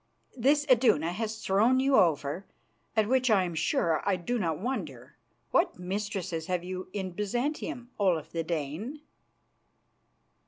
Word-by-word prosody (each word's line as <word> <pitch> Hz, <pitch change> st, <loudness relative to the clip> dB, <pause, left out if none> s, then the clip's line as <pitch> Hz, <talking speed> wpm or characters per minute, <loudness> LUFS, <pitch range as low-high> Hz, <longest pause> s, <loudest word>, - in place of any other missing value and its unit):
" -, -, -43 dB
this 285 Hz, +4 st, +3 dB
Iduna 230 Hz, -, +4 dB
has 220 Hz, +3 st, -4 dB
thrown 225 Hz, +7 st, +4 dB
you 270 Hz, +1 st, +3 dB
over, 165 Hz, -, +2 dB, 0.5 s
at 215 Hz, -2 st, +3 dB
which 255 Hz, +1 st, +2 dB
I 200 Hz, -4 st, +5 dB
am 175 Hz, -2 st, -3 dB
sure 160 Hz, 0 st, +1 dB
I 200 Hz, -, +2 dB
do 230 Hz, +8 st, -2 dB
not 165 Hz, -6 st, 0 dB
wonder, 250 Hz, -, -5 dB, 0.4 s
what 345 Hz, -, +2 dB
mistresses 185 Hz, -3 st, -3 dB
have 180 Hz, -2 st, -1 dB
you 185 Hz, +1 st, -6 dB
in 190 Hz, -2 st, -3 dB
Byzantium, 240 Hz, -, -3 dB
Olaf 180 Hz, -6 st, +1 dB
the 165 Hz, -1 st, -2 dB
Dane?" 170 Hz, -, -4 dB
195 Hz, 145 wpm, -29 LUFS, 170-245 Hz, 0.5 s, I